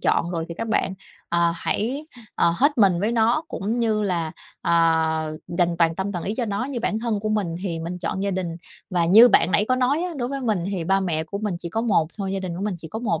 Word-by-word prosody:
chọn 170 +1 +1
rồi 165 -2 -2
thì 170 - -6
các 230 +3 -4
bạn, 195 -3 0 0.3
ờ, 170 0 +2
hãy, 265 - -2 0.3
ờ, 170 - +2
hết 285 -1 +2
mình 190 -5 +4
với 215 +4 0
nó 235 +7 +2
cũng 225 +5 -2
như 220 -2 +1
là, 170 -5 -1 0.3
ờ, 160 -2 +2 0.2
dành 175 -1 +2
toàn 165 -1 +3
tâm 195 +2 -3
toàn 175 - -4
ý 205 - -2
cho 245 - 0
nó. 205 +2 -2
Như 260 -3 -4
bản 215 -1 0
thân 225 -3 -1
của 215 - -2
mình 200 -6 -1
thì 170 -4 -3
mình 175 +2 -5
chọn 185 +3 -3
gia 200 - 0
đình 180 -3 -3 0.3
và 175 -2 +2
như 220 +8 +8
bạn 185 - +4
nãy 205 - +3
có 255 - +3
nói 265 +6 +1
á, 360 -1 -3
đối 245 -2 -2
với 275 0 -4
mình 215 -8 0
thì 180 -4 -3
ba 195 +2 +2
mẹ 160 -4 -1
của 200 +5 -5
mình 210 -3 -2
chỉ 170 - -6
có 220 +6 -2
một 205 -9 +2
thôi, 195 -1 -2
gia 195 - -2
đình 175 -2 -4
của 190 - -5
mình 210 -3 -1
chỉ 160 - -10
có 220 - -5
một 190 -9 -1
195 Hz, 270 wpm, -23 LUFS, 170-225 Hz, 0.3 s, như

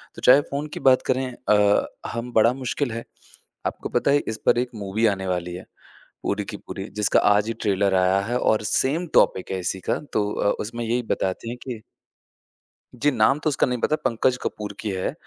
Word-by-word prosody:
तो - - -10
चाहे 130 +3 +7
फ़ोन 140 +2 -2
की - - -5
बात 130 - +4
करें 130 +1 0 0.2
अ, 105 -1 +4 0.3
हम 115 +1 -4
बड़ा 115 +2 +5
मुश्किल 130 0 -2
है। 115 +1 -5 0.6
आपको - - -5
पता - - +1
है, 145 - +4
इस 110 - -3
पर - - +4
एक 125 0 -1
मूवी 105 +2 -1
आने 95 0 -6
वाली 90 -1 -2
है, 90 - -9 0.6
पूरी 105 +1 -1
की 105 - -6
पूरी, 95 - -7 0.2
जिसका 105 - +3 0.2
आज 105 +1 +1
ही 115 - -1
ट्रेलर 100 -2 +2
आया 95 +1 +3
है 120 +3 -1
और 110 -3 +2
सेम 155 +7 +1
टॉपिक 95 - +3
है, 95 - -2
इसी 90 +1 -2
का। - - +1
तो 105 -1 +1
अ, 100 - +1
उसमें 115 +2 -5
यही 120 +2 0
बताते 95 +4 -3
हैं 120 - -5
कि 115 -4 -5 1.1
जी 145 +4 +2
नाम 130 +3 +3
तो - - +2
उसका 140 - +1
नहीं 125 -1 -2
पता 155 - +2
पंकज 125 +1 +2
कपूर 105 -1 -4
की 110 - -3
है। 95 -1 -2
110 Hz, 210 wpm, -24 LUFS, 100-125 Hz, 1.1 s, चाहे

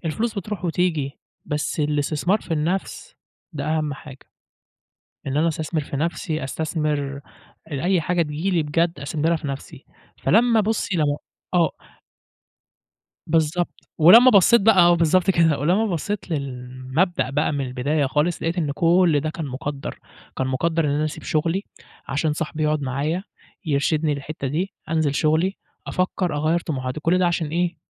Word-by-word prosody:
الفلوس 220 +8 -1
بتروح 200 0 -5
وتيجي، 160 -5 -1 0.3
بس 150 +1 -2
الاستثمار 150 +6 0
في - - -16
النَفْس 185 - -3 0.4
ده 145 -3 -4
أهم 155 -1 -1
حاجة 135 -1 -13 1.0
إن 135 +1 -2
أنا 165 +2 +3
أستثمر 160 0 -2
في 140 - -5
نَفْسي، 160 0 -2
أستثمر 150 -1 -2 0.5
أ 160 - -11
أي 185 -1 +3
حاجة 175 +2 +1
تيجي 155 +5 -2
لي 170 -4 +2
بجد 165 +1 0
أستثمرها 155 +4 0
في 155 - -7
نَفْسي، 135 0 -7 0.4
فلما 230 +1 +4
بُصّي 210 -3 -1
لما 145 -2 +1 0.4
آه. 170 -2 +4 1.6
بالضبط، 165 +2 -1
ولما 225 +11 +8
بصّيت 200 +2 +6
بقى 220 -1 +5
آه 175 0 +6
بالضبط 170 +3 +2
كده، 165 -6 +3
ولمّا 180 +9 +2
بصّيت 200 +2 -3
للمبدأ 130 +3 -2
بقى 150 +3 0
من 140 -2 -2
البداية 140 +4 0
خالص، 150 +5 0
لقيت 165 +2 -1
إن 150 -5 0
كل 170 0 +3
ده 155 +2 -2
كان 160 0 -5
مُقدَّر، 140 +1 -5 0.4
كان 130 - 0
مُقدَّر 160 +5 0
إن - - +1
أنا 145 +2 0
أسيب 155 - -6
شغلي 165 +5 0 0.4
عشان 150 +2 0
صاحبي 155 0 -3
يقعد 150 -1 +1
معايا، 145 +7 -2 0.4
يرشدني 150 +1 +1
للحتة 140 0 -5
دي، 175 +8 -2 0.2
أنزل 160 -3 +1
شغلي، 160 +6 +1 0.3
أفكّر، 185 -3 -1
أغيّر 155 +3 +1
طموحاتي، 130 -3 -4
كل 165 +4 +2
ده 185 - +3
عشان 165 -2 -1
إيه؟ 175 +2 -1
155 Hz, 155 wpm, -23 LUFS, 145-175 Hz, 1.6 s, ولما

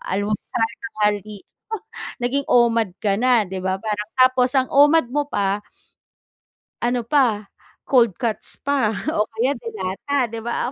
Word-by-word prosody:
alam 200 +2 0
mo - - +2
sana 225 -1 -1 0.4
mali 205 0 -2 0.8
naging 275 +3 0
OMAD 230 -5 +3
ka 200 -2 +2
na 245 -2 +4
di 190 +1 -5
ba? 190 0 0
Parang 210 0 -3
tapos 255 0 +4
ang 260 -1 +2
OMAD 290 -1 +5
mo 290 +1 0
pa 200 -6 0 1.2
ano 240 0 0
pa 235 -7 +2 0.4
cold 235 -8 +3
cuts 225 0 -3
pa 265 -7 +1 0.2
o 210 -8 0
kaya 235 +3 -1
delata 230 +4 -2
di 230 - -5
ba, 235 +2 -2
230 Hz, 145 wpm, -21 LUFS, 210-255 Hz, 1.2 s, OMAD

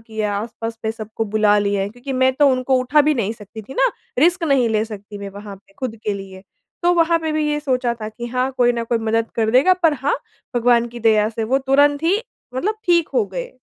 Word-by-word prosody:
किया, 220 -2 -3
आस-पास 225 +1 -5
पे 220 - -1
सबको 220 0 -5
बुला 210 0 +3
लिया 200 -1 0
है 195 - -2
क्योंकि 245 +5 -7
मैं 260 0 +3
तो 290 +1 +4
उनको 255 0 +1
उठा 255 +4 +3
भी 300 +1 +2
नहीं 220 -5 -1
सकती 220 0 -11
थी 265 +6 -11
ना, - - +3 0.3
रिस्क 345 +5 +3
नहीं 275 -6 +3
ले 215 -1 +1
सकती 205 -1 -9
मैं 200 0 -6
वहाँ 200 0 -9
पे 195 0 -26
खुद 250 -4 -4
के 210 - 0
लिए। 190 -1 -9 0.4
तो 350 +1 +4
वहाँ 335 0 +3
पे 320 -1 -3
भी 305 0 0
ये 295 - 0
सोचा 255 -4 0
था 215 - -4
कि 235 +2 -7
हाँ, 250 +2 -1
कोई 245 -1 +4
ना 235 -1 -2
कोई 230 0 0
मदद 225 0 -1
कर 220 -1 +1
देगा 265 +10 +5
पर 325 -2 +5
हाँ, 280 +1 0 0.4
भगवान 240 0 +3
की 240 0 -10
दया 215 -2 +3
से 225 0 -3
वो 260 +5 +2
तुरंत 285 +2 +3
ही 345 +5 +3 0.4
मतलब 390 +12 -1
ठीक 340 -3 +3
हो 475 - +3
गए। - - -6
240 Hz, 240 wpm, -20 LUFS, 220-285 Hz, 0.4 s, देगा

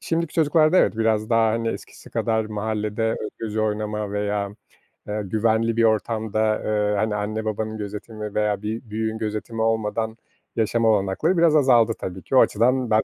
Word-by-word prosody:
şimdiki 165 -1 -2
çocuklarda, 155 +1 +4
evet, - - +3
biraz 110 -1 +1
daha 115 -1 +4
hani 115 0 -1
eskisi - - -8
kadar 110 -1 0
mahallede 110 +1 -2
özgürce 110 0 -4
oynama 105 -1 -2
veya, 105 0 -2 0.5
eee, 105 +1 -2
güvenli 110 +3 +1
bir 115 - +3
ortamda, 110 0 +1
eee, 105 -1 +1
hani, 110 +1 0
anne 110 +1 -3
babanın 110 0 -3
gözetimi 105 +1 -6
veya 105 -1 0
bir 110 +1 -5
büyüğün 110 +1 -2
gözetimi 110 +1 -3
olmadan 110 0 -1 0.4
yaşama 115 +1 +2
olanakları 105 - +1
biraz 165 -2 +5
azaldı 120 -5 +5
tabii 95 0 -6
ki. 135 - -1
O - - +9
açıdan. 125 +2 +2
110 Hz, 155 wpm, -23 LUFS, 105-115 Hz, 0.5 s, O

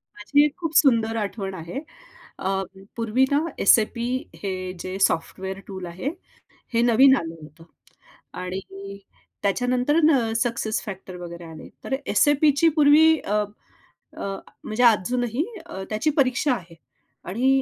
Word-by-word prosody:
माझी 285 +8 +3
एक 295 0 -2
खूप 330 -3 -3
सुंदर 230 -5 +4
आठवण 200 -2 -3
आहे. 170 +11 -5 0.6
अ, 190 - -2 0.5
पूर्वी 230 +3 +2
ना 285 - +4 0.3
SAP 235 +1 +4 0.4
हे 195 - -1 0.3
जे 185 +1 -4
सॉफ्टवेअर 190 +3 -3
टूल 190 -2 -6
आहे 180 +10 -4 0.6
हे 230 - +3
नवीन 265 +4 +7
आलं 165 0 -5
होतं 155 +2 -14 0.8
आणि 195 +2 -7 0.5
त्याच्यानंतर 250 +7 +1 0.2
अ, 225 -2 -1
सक्सेस 235 -2 -1
फॅक्टर 190 -2 -8
वगैरे 170 0 -8
आले. 155 - -11
तर 265 - -1 0.2
SAPची 295 +2 +4
पूर्वी 300 +1 +7
अ, 210 +1 0 0.7
अ, 195 0 -4 0.3
म्हणजे 215 +3 -1
अजूनही 245 - -1 0.2
अ, 190 - -7
त्याची 215 +8 +1
परीक्षा 255 +1 +2
आहे 175 -6 -9 0.6
आणि 240 +7 +1
220 Hz, 130 wpm, -24 LUFS, 190-260 Hz, 0.8 s, नवीन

